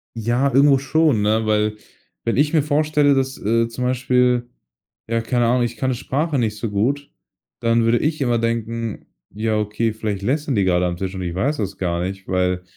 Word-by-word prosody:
Ja, 120 +5 0
irgendwo 140 +1 +5
schon, 135 -4 +2
ne, 110 +1 +1
weil 105 0 +1 0.5
wenn 115 +1 -1
ich 150 +2 +2
mir 155 - +4
vorstelle, 150 -1 +2
dass, 135 0 0
äh, 115 +2 +1
zum 115 +2 -5
Beispiel 125 -1 +1 0.6
ja, 115 0 0
keine 120 +1 0
Ahnung, 125 +1 +2
ich 120 0 -3
kann 130 - -1
'ne 130 - 0
Sprache 145 +5 -1
nicht 110 -3 -1
so 115 +1 -3
gut, 130 +8 -1 0.5
dann 115 0 +2
würde 115 +1 +3
ich 155 -1 -1
immer 120 -3 +2
denken: 115 -1 -3 0.2
„Ja, 110 +1 -1
okay, 105 +2 -1
vielleicht 105 -3 -3
lästern 145 +2 0
die 100 - +2
gerade 90 -1 +2
am 85 - -1
Tisch, 95 0 -4
und 95 - -4
ich 85 0 -4
weiß 140 +10 0
das 100 -3 -4
gar 85 -2 -1
nicht, 95 +1 -6
weil“ 90 -1 0
115 Hz, 200 wpm, -21 LUFS, 105-135 Hz, 0.6 s, irgendwo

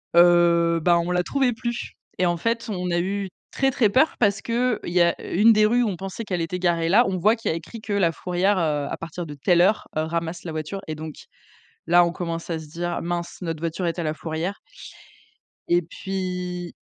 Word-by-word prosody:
heu, 170 -1 +5
bah, 170 +1 +4
on 170 +1 -2
la 180 0 +1
trouvait 265 0 +1
plus, 235 +1 -4 0.3
et 185 - +3
en 175 0 0
fait, 230 +4 -1
on 180 -3 -2
a 175 - +2
eu 195 +2 -2 0.2
très, 270 0 +1
très 235 -6 +3
peur, 285 +9 +3
parce 200 -3 +2
qu'il 240 0 0
y 175 0 +1
a 170 0 +2
une 220 +5 +6
des 215 0 +4
rues 240 +3 +3
où 225 - +1
on 195 - -3
pensait 195 +5 -6
qu'elle 180 -5 -2
était 165 +2 -3
garée 170 -2 +1
là. 215 +7 +6
On 190 -1 -1
voit 210 +6 +4
qu'il 225 - -3
y - - +1
a - - -2
écrit 190 +8 -9
que 215 -1 -4
la 190 -5 +3
fourrière, 185 +4 0
heu, 150 -4 0
à - - -4
partir 165 +1 -6
de 150 - -8
telle 175 +5 +3
heure, 205 +4 +2
heu, - - +2
ramasse 170 +1 -3
la 165 - -5
voiture, 155 +5 -4
et 155 - -4
donc 155 0 -7 0.7
là, 175 +1 +6
on 170 - -1
commence 170 -1 -4
à 165 -2 -2
se 155 - -10
dire: 175 +2 -3
«Mince, 175 0 -4
notre 165 -3 -3
voiture 165 +2 -2
est 170 +1 -2
à - - -1
la 155 -1 -1
fourrière». 165 +5 -4 1.1
Et 175 0 +3
puis 180 0 -5
175 Hz, 230 wpm, -24 LUFS, 170-200 Hz, 1.1 s, une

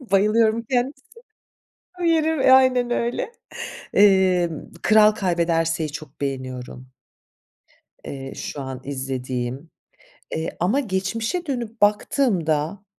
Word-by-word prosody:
Bayılıyorum 220 0 +2
kendisine. 265 +2 -1 0.9
O - - -3
yeri 320 -5 +3
aynen 255 -2 +5
öyle. 240 - -1 0.6
Eee, 190 -3 +4 0.3
Kral 215 -1 +6
Kaybederse'yi 165 -5 0
çok 150 -1 -10
beğeniyorum. 130 -2 -5 1.1
Eee, 135 -1 -7
şu 145 - -6
an 130 -1 -6
izlediğim, 130 +1 -4 0.7
eee, 160 +1 -4
ama 200 +11 +2
geçmişe 225 - -2
dönüp 235 -6 -4
baktığımda, 200 - +1
190 Hz, 90 wpm, -23 LUFS, 145-240 Hz, 1.1 s, Kral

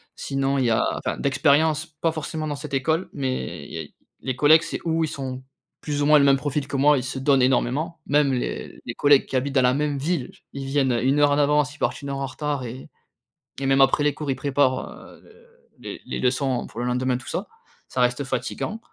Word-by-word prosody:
Sinon, 135 0 -1
il 130 - +1
y - - +2
a 110 - +2
enfin - - -3
d'expérience, 150 +3 +2
pas 160 0 -2
forcément 155 0 -4
dans 145 - -2
cette 145 0 -8
école, 160 +6 0
mais 130 - -3
il - - -13
y - - -4
a - - -2
i - - -16 0.3
les 130 -1 -3
collègues, 155 +2 +6
c'est - - -4
ou 165 0 +1
ils - - 0
sont 130 -1 -5 0.4
plus 145 -1 -2
ou - - +2
moins 150 0 +7
le 140 - +4
même 135 -1 +5
profil 145 0 -2
que 140 0 -4
moi, 145 +2 +5
ils 125 - -2
se 130 0 -4
donnent 135 0 +3
énormément. 135 +6 +1
Même 145 -1 +3
les 125 - -4
les - - -4
collègues 145 -1 +4
qui - - -6
habitent 135 +2 -1
dans 130 - +5
la 125 0 +4
même 145 0 -1
ville, 145 -2 -2
j - - -23
ils 135 -1 -5
viennent, 135 -2 +1
heu, 120 - 0
1 135 +3 +2
heure 145 -1 +5
en 145 - +2
avance, 150 0 +2
ils - - -20
partent - - -1
1 140 - -6
heure 140 - -3
en 135 - -1
retard 145 0 -3
et 125 +2 -8 0.7
et 135 - -3
même 135 0 +4
après 135 +2 +4
les 145 -1 +2
cours, 150 0 -6
ils 135 - +1
préparent, 135 -1 0
heu, - - -14
de 470 +1 -16
les - - -8
les - - -4
leçons 130 0 0
pour 120 - -7
le - - -2
lendemain 125 0 0
tout 125 - -12
ça. - - -3 0.4
Ça 125 - -2
reste 125 +3 +1
fatiguant 135 - -3
140 Hz, 250 wpm, -24 LUFS, 130-150 Hz, 0.7 s, moins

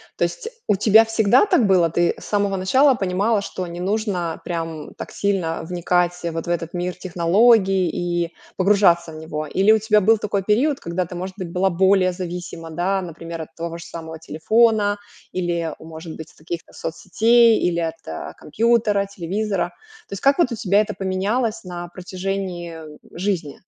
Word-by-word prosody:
То - - -1
есть, - - -5 0.2
у 210 - +3
тебя 220 +3 +6
всегда 225 - +3
так 345 - +3
было? 180 -4 +4
Ты 175 +2 +1
с - - -12
самого 200 -1 0
начала 260 +9 +4
понимала, 200 +1 0
что 185 -2 -5
не 175 0 -7
нужно 185 -4 -2
прям 165 -3 -5
так - - -8
сильно 190 -5 -1
вникать 175 0 +1 0.2
вот 165 0 -4
в - - -6
этот 170 0 -3
мир 180 0 -2
технологий 185 +1 +3
и 175 0 -2 0.3
погружаться 185 -4 +3
в - - -10
него? 155 -1 -5
Или 195 +7 +3
у 220 - +5
тебя 215 0 +3
был 220 +2 +4
такой 200 -2 -1
период, 265 +8 +2
когда 170 +1 -3
ты, 180 - -8
может 185 +2 -5
быть, 180 -2 -4
была 190 +1 +1
более 190 +1 +3
зависима, 175 -2 -6
да, 185 +4 0
например, 165 -1 -7
от 150 - -10
того 170 0 -5
же - - -8
самого 160 -1 -8
телефона 205 +5 +2 0.3
или, 170 -2 -2
может 160 0 -9
быть, 160 0 -9
от - - -27
каких-то 170 +2 -7
соцсетей, 225 +7 +3
или 170 -1 0
от 160 - -5
компьютера, 215 +1 +1
телевизора. 195 -1 -2 0.4
То - - -9
есть, 195 - -7
вот 275 +1 +5
как 335 -8 +2
у - - -2
тебя 200 -1 +2
это 210 -1 0
поменялось 200 +5 -1
на 175 -1 -6
протяжении, 185 -1 -5
э, 155 -2 -11 0.2
жизни? 180 -5 -3
185 Hz, 175 wpm, -21 LUFS, 170-205 Hz, 0.4 s, тебя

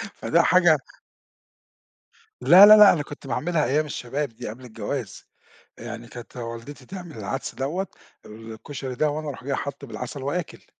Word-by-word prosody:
فده 170 - +2
حاجة 175 -2 +5 1.6
لا 190 +4 +9
لا 215 +1 +10
لأ 210 -2 +9
أنا 155 - -1
كنت 145 -1 -11
باعملها 155 +5 0
أيام 150 +5 +1
الشباب 140 +1 -3
دي 115 - -8
قبل 120 +4 -10
الجواز، 115 0 -6 0.5
يعني 120 0 -8
كانت 120 +1 -11
والدتي 120 +3 -8
تعمل 180 -4 -9
العدس 110 +6 -4
دوّة 160 +9 -2 0.4
الكشري 115 +5 -8
ده 150 +4 +1
وأنا 155 0 -4
أروح 130 -2 -7
جاي 140 0 -2
حاطه 140 +1 -5
بالعسل 125 +3 -7
وآكِل. 155 +5 -4
140 Hz, 150 wpm, -24 LUFS, 120-155 Hz, 1.6 s, لا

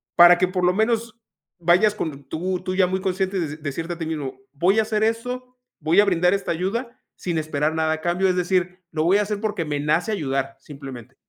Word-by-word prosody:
para 175 0 +8
que 185 0 +2
por 185 -1 -2
lo 180 - +4
menos, 225 +1 0 0.5
vayas 180 +5 +4
con 145 -8 -4
tú, 180 +3 -2
tú 185 - -2
ya 185 -1 +4
muy 190 +1 -2
consciente 190 0 -1
des 155 -2 -4
decirte 165 +4 -3
a 170 - -9
ti 165 - -4
mismo: 145 -5 -4
"Voy 180 +8 +3
a - - +4
hacer 215 0 0
eso, 250 +3 -2 0.2
voy 160 +6 +3
a - - +2
brindar 180 -2 +3
esta 200 -1 -1
ayuda 235 +9 -3 0.2
sin 175 -3 -2
esperar 155 0 -1
nada 160 0 +1
a 160 - -5
cambio. 180 +3 +1
Es 180 - +1
decir, 180 0 0
lo 155 0 0
voy 185 +4 +5
a 210 - +2
hacer, 205 0 -3
porque 210 -6 -2
me 145 -1 -2
nace 155 +8 +1
ayudar, 135 -6 -2
simplemente". 135 -6 -10
180 Hz, 225 wpm, -23 LUFS, 155-200 Hz, 0.5 s, para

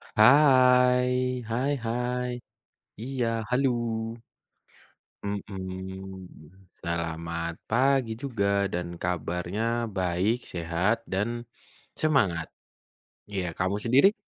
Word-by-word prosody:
Hai, 125 0 +6 0.3
hai 130 +5 0
hai, 125 +2 -1 0.7
iya, 125 -1 -1 0.2
haluw. 120 -3 0 1.1
Mmm, 95 -2 -6 0.5
selamat 85 0 -3 0.2
pagi 130 0 +3
juga 115 -7 -1 0.3
dan 90 0 -2
kabarnya 90 +3 -2 0.4
baik, 95 +5 +1 0.2
sehat, 85 +5 +1 0.2
dan 100 +4 +1 0.7
semangat. 95 - +2 0.9
Ya, 95 - 0
kamu 95 +2 +1
sendiri? 140 - +5
110 Hz, 75 wpm, -27 LUFS, 90-125 Hz, 1.1 s, Hai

